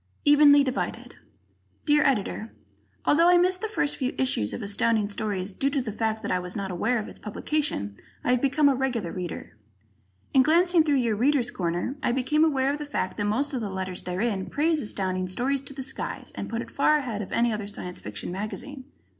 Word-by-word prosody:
"Evenly 290 Hz, -1 st, +7 dB
Divided" 250 Hz, -2 st, -3 dB, 0.7 s
Dear 295 Hz, 0 st, +4 dB
Editor: 220 Hz, -4 st, -1 dB, 0.5 s
Although 335 Hz, +4 st, +5 dB
I 355 Hz, -, +6 dB
missed 365 Hz, +1 st, +2 dB
the 440 Hz, -, -1 dB
first 355 Hz, -9 st, -1 dB
few 260 Hz, -1 st, -2 dB
issues 110 Hz, -, +1 dB
of -, -, -5 dB
Astounding 210 Hz, +1 st, +1 dB
Stories 205 Hz, -2 st, -3 dB
due 270 Hz, +8 st, 0 dB
to 280 Hz, -, 0 dB
the 245 Hz, -4 st, -3 dB
fact 220 Hz, +1 st, -2 dB
that -, -, -2 dB
I 185 Hz, -, +2 dB
was 180 Hz, +2 st, -7 dB
not 195 Hz, -2 st, -3 dB
aware 220 Hz, +8 st, 0 dB
of 215 Hz, -, -4 dB
its -, -, -11 dB
publication, 210 Hz, -, -2 dB, 0.3 s
I -, -, +1 dB
have 250 Hz, -1 st, +2 dB
become 285 Hz, +2 st, +3 dB
a 280 Hz, -, +5 dB
regular 250 Hz, -9 st, -1 dB
reader. 180 Hz, -10 st, -6 dB, 0.8 s
In 265 Hz, -, +7 dB
glancing 345 Hz, +4 st, +4 dB
through 295 Hz, -2 st, +2 dB
your 235 Hz, -5 st, +1 dB
"Readers' 250 Hz, +2 st, +2 dB
Corner," 175 Hz, +9 st, -2 dB
I 245 Hz, -, +1 dB
became 265 Hz, +5 st, +2 dB
aware 275 Hz, -4 st, +2 dB
of 295 Hz, -, -4 dB
the 295 Hz, -, -4 dB
fact 185 Hz, -10 st, -2 dB
that 205 Hz, -, -1 dB
most 270 Hz, +8 st, 0 dB
of 255 Hz, -, -2 dB
the 210 Hz, -, -3 dB
letters 190 Hz, -1 st, -4 dB
therein 190 Hz, +2 st, -2 dB
praise 310 Hz, +1 st, +1 dB
Astounding 185 Hz, -4 st, -2 dB
Stories 255 Hz, +8 st, -1 dB
to 275 Hz, -, -7 dB
the 270 Hz, -, -5 dB
skies, -, -, -5 dB
and -, -, -5 dB
put 230 Hz, +1 st, -2 dB
it -, -, -13 dB
far 305 Hz, +2 st, +3 dB
ahead 240 Hz, -8 st, -3 dB
of 195 Hz, -, -7 dB
any 235 Hz, -1 st, +2 dB
other 210 Hz, -1 st, -4 dB
Science 180 Hz, -3 st, -4 dB
Fiction 105 Hz, +10 st, -5 dB
magazine. 235 Hz, +8 st, -5 dB
245 Hz, 210 wpm, -26 LUFS, 200-285 Hz, 0.8 s, Evenly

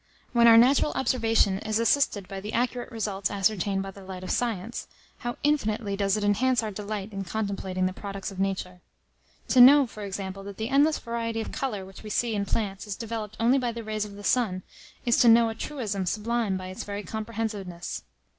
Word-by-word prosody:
When 235 Hz, -1 st, +6 dB
our 225 Hz, -1 st, +9 dB
natural 265 Hz, +5 st, +5 dB
observation 225 Hz, -6 st, +2 dB
is 215 Hz, +1 st, -1 dB
assisted 230 Hz, -4 st, +2 dB
by 195 Hz, -1 st, -6 dB
the 210 Hz, +2 st, -6 dB
accurate 245 Hz, 0 st, -1 dB
results 205 Hz, -4 st, -2 dB
ascertained 195 Hz, -1 st, 0 dB
by 195 Hz, -, -6 dB
the 195 Hz, 0 st, -13 dB
light 185 Hz, -1 st, -8 dB
of -, -, -3 dB
science, 230 Hz, -1 st, -2 dB, 0.3 s
how 240 Hz, 0 st, -4 dB
infinitely 220 Hz, -8 st, +1 dB
does 195 Hz, 0 st, +1 dB
it 210 Hz, -, -2 dB
enhance 235 Hz, +4 st, +2 dB
our 215 Hz, -, -3 dB
delight 210 Hz, 0 st, -5 dB
in 195 Hz, 0 st, -3 dB
contemplating 190 Hz, -2 st, -2 dB
the 185 Hz, -, -1 dB
products 195 Hz, 0 st, -6 dB
of 190 Hz, -, -9 dB
nature! 185 Hz, -2 st, -2 dB, 0.7 s
To 255 Hz, -, +6 dB
know, 280 Hz, +3 st, +9 dB
for 215 Hz, -3 st, -10 dB
example, 195 Hz, -1 st, -5 dB
that 200 Hz, -1 st, -8 dB
the 220 Hz, +1 st, -3 dB
endless 290 Hz, +3 st, +4 dB
variety 230 Hz, -1 st, -3 dB
of 220 Hz, -, -4 dB
colour 210 Hz, -8 st, -3 dB
which 190 Hz, 0 st, -12 dB
we 215 Hz, -, -8 dB
see 230 Hz, +2 st, 0 dB
in 200 Hz, -1 st, -1 dB
plants 200 Hz, -1 st, -2 dB
is 205 Hz, -, -3 dB
developed 220 Hz, -2 st, -5 dB
only 245 Hz, +4 st, +4 dB
by 245 Hz, -2 st, -1 dB
the 230 Hz, 0 st, -6 dB
rays 215 Hz, -1 st, -2 dB
of 205 Hz, -1 st, -8 dB
the 205 Hz, -, -10 dB
sun, 200 Hz, -6 st, +1 dB, 0.4 s
is 235 Hz, -, +3 dB
to 240 Hz, -, +5 dB
know 230 Hz, 0 st, +7 dB
a -, -, -3 dB
truism 215 Hz, -7 st, -3 dB
sublime 220 Hz, 0 st, 0 dB
by 185 Hz, 0 st, -6 dB
its 185 Hz, -, -6 dB
very 205 Hz, 0 st, -5 dB
comprehensiveness. 215 Hz, -6 st, -4 dB
215 Hz, 205 wpm, -27 LUFS, 195-235 Hz, 0.7 s, our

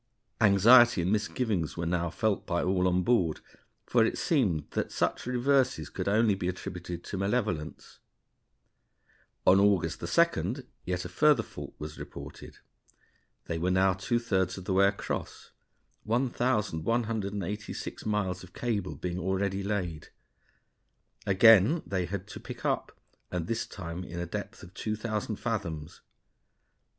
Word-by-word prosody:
Anxiety 115 Hz, +1 st, +7 dB
and 90 Hz, -, 0 dB
misgivings 110 Hz, -5 st, -1 dB
were 85 Hz, -, -2 dB
now 85 Hz, 0 st, 0 dB
felt 105 Hz, +4 st, -1 dB
by 85 Hz, -2 st, 0 dB
all 90 Hz, 0 st, +2 dB
on 90 Hz, 0 st, +2 dB
board, 90 Hz, -8 st, +2 dB, 0.5 s
for 120 Hz, -2 st, +3 dB
it 110 Hz, -, 0 dB
seemed 100 Hz, -, +1 dB
that -, -, -2 dB
such -, -, -1 dB
reverses 125 Hz, -, +1 dB
could -, -, -4 dB
only 110 Hz, +1 st, +3 dB
be 95 Hz, -2 st, -3 dB
attributed 90 Hz, -2 st, -5 dB
to 95 Hz, -, -5 dB
malevolence. 100 Hz, -7 st, -2 dB, 1.5 s
On 95 Hz, +1 st, +6 dB
August 95 Hz, -5 st, +2 dB
2d 130 Hz, -, +1 dB, 0.2 s
yet 90 Hz, 0 st, -2 dB
a -, -, -5 dB
further 145 Hz, +4 st, +4 dB
fault -, -, -9 dB
was 75 Hz, 0 st, -7 dB
reported; -, -, -9 dB, 0.9 s
they 80 Hz, -, -3 dB
were 90 Hz, +2 st, 0 dB
now 95 Hz, +1 st, +3 dB
two 95 Hz, +6 st, -1 dB
thirds 95 Hz, -5 st, 0 dB
of 95 Hz, -, -8 dB
the 95 Hz, -, -1 dB
way 100 Hz, +1 st, +5 dB
across, 100 Hz, 0 st, -4 dB, 0.5 s
1,186 105 Hz, -4 st, -1 dB
miles 95 Hz, -4 st, -1 dB
of 90 Hz, -1 st, -14 dB
cable 105 Hz, -6 st, -2 dB
being 90 Hz, 0 st, -4 dB
already 95 Hz, +2 st, -1 dB
laid. 95 Hz, -6 st, -3 dB, 1.2 s
Again 110 Hz, -, +6 dB
they 95 Hz, -3 st, -2 dB
had 95 Hz, +1 st, -4 dB
to -, -, -8 dB
pick -, -, -9 dB
up, -, -, 0 dB, 0.4 s
and 90 Hz, -2 st, -3 dB
this 115 Hz, +4 st, -2 dB
time 85 Hz, -1 st, -6 dB
in 85 Hz, -1 st, -8 dB
a 85 Hz, -, -2 dB
depth 85 Hz, -, -6 dB
of 90 Hz, 0 st, -12 dB
2,000 110 Hz, 0 st, -3 dB
fathoms. 100 Hz, -10 st, -4 dB
95 Hz, 140 wpm, -29 LUFS, 90-110 Hz, 1.5 s, Anxiety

